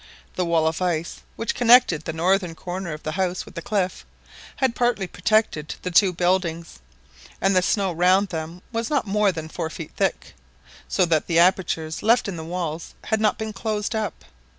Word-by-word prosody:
The 180 - -1
wall 165 -2 +2
of 160 +2 -1
ice, 170 -2 -2
which 230 - -2
connected 240 -10 +5
the - - -2
northern 175 +1 +1
corner 180 0 -5
of 150 +1 -7
the 155 - -3
house 185 +1 -1
with - - -13
the - - -5
cliff, 200 -6 -1 0.5
had 260 -3 +1
partly 240 -5 +1
protected 180 -4 0
the 180 - -3
two 185 +2 +5
buildings, 175 - -1 0.6
and 195 +1 +2
the 185 - +5
snow 195 0 +1
round 185 +4 +3
them 165 +2 -6
was 230 0 -2
not 290 -6 +1
more 205 0 +2
than 160 -3 -6
four 160 0 -4
feet 160 0 -8
thick, - - -1 0.5
so 185 - +2
that 160 -3 +1
the 165 - +1
apertures 170 -3 +2
left 225 +2 +3
in 195 - -4
the 160 - -6
walls 165 -1 -4
had 220 -1 0
not 215 -1 +2
been 220 -1 -4
closed 215 -1 -2
up. 220 -2 -3
185 Hz, 190 wpm, -23 LUFS, 165-210 Hz, 0.6 s, connected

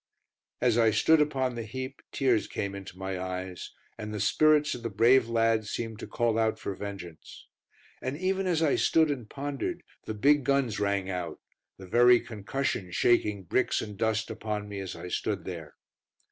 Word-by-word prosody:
As 120 -2 +3
I 115 -1 +5
stood 150 +9 +4
upon 135 -4 0
the 120 - -4
heap 130 +4 -6
tears 125 -6 +2
came 100 -1 -3
into 95 -2 -9
my 95 -1 -4
eyes, 90 -1 -5 0.3
and 105 -1 -5
the 105 - -4
spirits 150 +8 +4
of 125 - -6
the 115 - -3
brave 115 +4 +4
lads 115 -2 +2
seemed 115 -2 -4
to - - -7
call 115 -1 0
out 110 -1 +1
for 100 - -4
vengeance. 95 -5 -9 0.6
And 130 +3 -3
even 190 +2 0
as 165 -3 +2
I 150 - +3
stood 160 -2 +3
and 125 -6 -5
pondered, 140 0 -4 0.2
the 110 - -4
big 145 +6 +4
guns 140 -4 +1
rang 100 -2 0
out, 90 -3 -4 0.4
the 95 - -10
very 120 +5 +6
concussion 110 -3 -3
shaking 105 -1 +2
bricks 110 +9 +1
and 105 -1 -5
dust 110 +2 0
upon 105 -1 -4
me 100 -1 -6
as 95 -2 -5
I - - -8
stood 100 +1 -2
there. 80 -5 -7
110 Hz, 180 wpm, -28 LUFS, 100-130 Hz, 0.6 s, very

